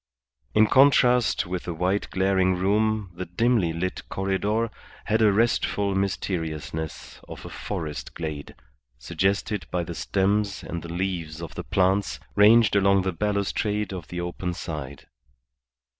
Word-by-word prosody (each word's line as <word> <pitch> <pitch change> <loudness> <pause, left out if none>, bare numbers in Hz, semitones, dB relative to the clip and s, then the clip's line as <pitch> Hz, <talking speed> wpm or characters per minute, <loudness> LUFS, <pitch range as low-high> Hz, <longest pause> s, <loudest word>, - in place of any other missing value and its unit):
In 110 0 +6
contrast 125 -1 +4
with 90 0 -4
the 85 - -4
white 90 +4 0
glaring 95 -1 +2
room 105 +1 +1
the 90 +1 -6
dimly 110 -1 +2
lit 90 +3 -3
corredor 105 +4 -1 0.3
had 110 +3 +1
a 105 -2 +6
restful 100 -2 +1
mysteriousness 80 -5 -3
of - - -9
a - - -7
forest 75 -2 -5
glade, 75 -3 -6 0.4
suggested 95 - -1
by 90 -1 -1
the 85 - -6
stems 100 +2 0
and 85 - -5
the 85 - -8
leaves 85 -3 -3
of 85 -2 -7
the - - -5
plants 95 +1 +1 0.2
ranged 105 +1 +6
along 100 -1 +4
the 95 -1 -1
balustrade 105 +2 -1
of 90 -4 -7
the 90 - -5
open 90 0 -4
side. 70 -5 -6
95 Hz, 140 wpm, -25 LUFS, 85-105 Hz, 0.4 s, In